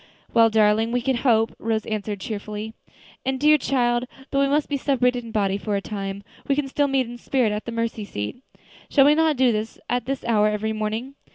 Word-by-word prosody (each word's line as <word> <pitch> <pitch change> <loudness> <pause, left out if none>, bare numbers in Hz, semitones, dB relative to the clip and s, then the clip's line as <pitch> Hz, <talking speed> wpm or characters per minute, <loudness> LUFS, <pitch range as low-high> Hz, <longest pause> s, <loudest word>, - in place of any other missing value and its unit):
"Well, 230 -1 +6
darling, 220 +1 +3
we 245 - +1
can 260 -1 +1
hope," 225 -3 +2
Rose 220 -1 -1
answered 210 -2 -3
cheerfully. 215 0 -5 0.5
"And, 265 0 -1
dear 300 +1 +5
child, 240 -2 +1 0.3
though 275 - +1
we 275 - +3
must 290 +2 +1
be 290 - -1
separated 250 -3 +1
in 230 - -9
body 200 -2 0
for 210 0 -2
a - - +1
time, 195 -1 -5 0.2
we 275 - +2
can 290 -1 -1
still 285 +1 +1
meet 270 -2 +1
in 240 +1 -9
spirit 250 -5 +1
at 210 +1 -4
the 235 - -4
mercy 230 -1 -2
seat. 105 - -5 0.5
Shall 275 -2 +5
we 295 - +6
not 315 -2 +2
do 240 -5 +3
so 220 - -15
at 245 -2 0
this 270 0 -3
hour 215 -3 +3
every 215 +1 -1
morning?" 220 +5 -3
230 Hz, 215 wpm, -23 LUFS, 215-265 Hz, 0.5 s, Well